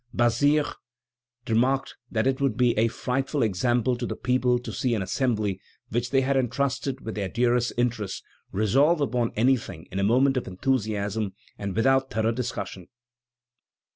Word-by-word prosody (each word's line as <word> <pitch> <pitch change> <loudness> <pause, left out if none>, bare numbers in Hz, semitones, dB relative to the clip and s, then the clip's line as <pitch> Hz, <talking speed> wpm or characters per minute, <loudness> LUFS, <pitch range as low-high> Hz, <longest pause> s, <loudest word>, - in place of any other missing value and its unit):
Bazire 145 +5 +3 0.8
remarked 125 +4 +1
that 110 0 0
it 135 0 +1
would 135 -6 +1
be 120 -2 +3
a 110 +2 +3
frightful 135 +4 -1
example 120 +4 +1
to 120 0 -4
the - - -3
people 125 0 +1
to 120 - -7
see 125 -3 0
an 105 - -1
Assembly 105 -2 -1 0.3
which 120 +1 -1
they 135 0 +3
had 135 +1 +1
entrusted 135 +1 -1
with 110 - -5
their 100 -3 -3
dearest 120 0 +1
interests, 115 -5 -1 0.3
resolve 135 - +3
upon 125 -5 0
anything 110 -8 0
in 95 - -3
a - - +1
moment 130 +6 +3
of 125 - -2
enthusiasm 105 -1 -1 0.2
and 100 -2 -5
without 135 +3 +3
thorough 110 +1 +1
discussion. 115 -7 -4
120 Hz, 155 wpm, -26 LUFS, 110-130 Hz, 0.8 s, Bazire